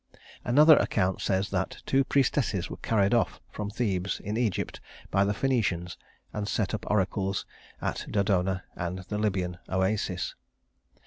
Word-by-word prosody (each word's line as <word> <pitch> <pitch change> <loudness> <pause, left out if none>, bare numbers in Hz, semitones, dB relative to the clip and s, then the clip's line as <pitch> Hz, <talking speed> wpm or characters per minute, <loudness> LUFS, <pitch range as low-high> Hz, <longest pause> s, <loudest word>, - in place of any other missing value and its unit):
Another 150 +5 +7
account 95 0 +1
says 95 +1 0
that 95 -1 -2
two 135 0 +3
priestesses 125 -9 +1
were - - -5
carried 100 -1 +2
off 120 - +1
from 105 -1 -4
Thebes 100 -4 -1
in 105 +2 -4
Egypt 115 -5 -1 0.3
by 100 +1 +4
the 100 - +1
Phœnicians, 105 -8 0 0.4
and 105 -1 -3
set 105 -1 0
up 110 - -4
oracles 95 -1 0 0.4
at - - -2
Dodona 95 -2 +1
and 85 +1 -3
the 105 - -2
Libyan 95 -4 -1
Oasis. 95 -1 0
100 Hz, 140 wpm, -28 LUFS, 95-110 Hz, 0.4 s, Another